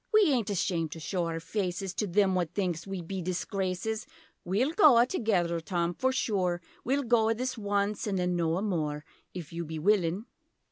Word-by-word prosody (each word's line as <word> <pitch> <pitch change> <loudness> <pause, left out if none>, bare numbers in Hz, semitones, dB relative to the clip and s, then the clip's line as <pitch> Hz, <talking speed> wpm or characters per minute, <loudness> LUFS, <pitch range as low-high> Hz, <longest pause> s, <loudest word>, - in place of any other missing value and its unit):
We 425 -7 +5
aint 235 -6 +1
ashamed 175 -4 0
to 165 - -8
show 175 +2 -2
our 165 0 -3
faces 185 +1 -3
To 210 - -1
them 195 +1 +3
what 175 -2 -1
thinks 180 -3 -1
we 195 -2 -4
be 190 +3 -4
disgraces. 190 +4 -2 0.4
We'll 215 - +1
goa 290 - +7
together 190 - 0
Tom 170 +1 -1
for 260 +8 +1
sure 190 -9 0 0.2
We'll 275 +3 +1
goa 225 -2 +3
this 255 +2 -2
once 205 -1 -1
an' 200 - 0
then 180 -1 0
noa 170 +2 0
more 150 -7 -2 0.3
If 170 -3 -7
you 170 0 -3
be 160 0 -6
willin'? 185 +2 +2
190 Hz, 180 wpm, -29 LUFS, 170-220 Hz, 0.4 s, goa